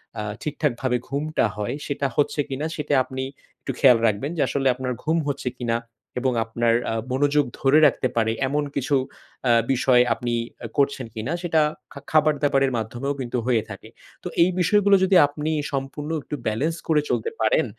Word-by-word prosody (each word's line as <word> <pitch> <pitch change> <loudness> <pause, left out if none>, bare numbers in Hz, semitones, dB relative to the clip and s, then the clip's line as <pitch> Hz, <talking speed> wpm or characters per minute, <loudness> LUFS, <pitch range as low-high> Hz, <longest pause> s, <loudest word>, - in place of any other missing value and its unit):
অ্যা 105 - -4 0.2
ঠিকঠাকভাবে 135 -4 -1
ঘুমটা 150 +1 0
হয়, 105 +5 -3
সেটা 140 -1 -1
হচ্ছে 145 +1 0
কিনা 135 +3 -3
সেটা 150 -1 -2
আপনি 130 +1 -5 0.4
একটু - - -3
খেয়াল 125 -4 +7
রাখবেন। 110 +9 -1
যে - - +1
আসলে 135 -1 0
আপনার 130 0 -3
ঘুম 160 +2 +1
হচ্ছে 130 -2 -2
কিনা 115 -2 0 0.4
এবং 130 0 0
আপনার 115 +1 +1 0.2
আ - - -1 0.2
মনোযোগ 145 +2 +2
ধরে 140 +3 +5
রাখতে - - 0
পারে 110 -1 +2 0.2
এমন 145 +2 0
কিছু 140 +1 0 0.5
অ্যা 120 - +4 0.2
বিষয় 125 -1 +4
আপনি 120 0 -3 0.3
অ্যা 115 - -6
করছেন 140 -3 +1
কিনা, 115 +8 -3
সেটা 160 -2 +2 0.3
খা 140 - -8
খাবার-দাবারের 145 -3 +3
মাধ্যমেও 120 +5 -3
কিন্তু 125 -1 -3
হয়ে 115 -4 +2
থাকে। - - -9 0.3
তো - - -4 0.2
এই 180 - +3
বিষয়গুলো 200 +3 +4
যদি 190 0 +3
আপনি 150 +2 -3 0.2
সম্পূর্ণ 140 +2 -4
একটু 150 - -6
balance 145 +10 -1
করে 155 -2 +3
চলতে 455 - 0
পারেন, - - +3
140 Hz, 170 wpm, -23 LUFS, 125-150 Hz, 0.5 s, খেয়াল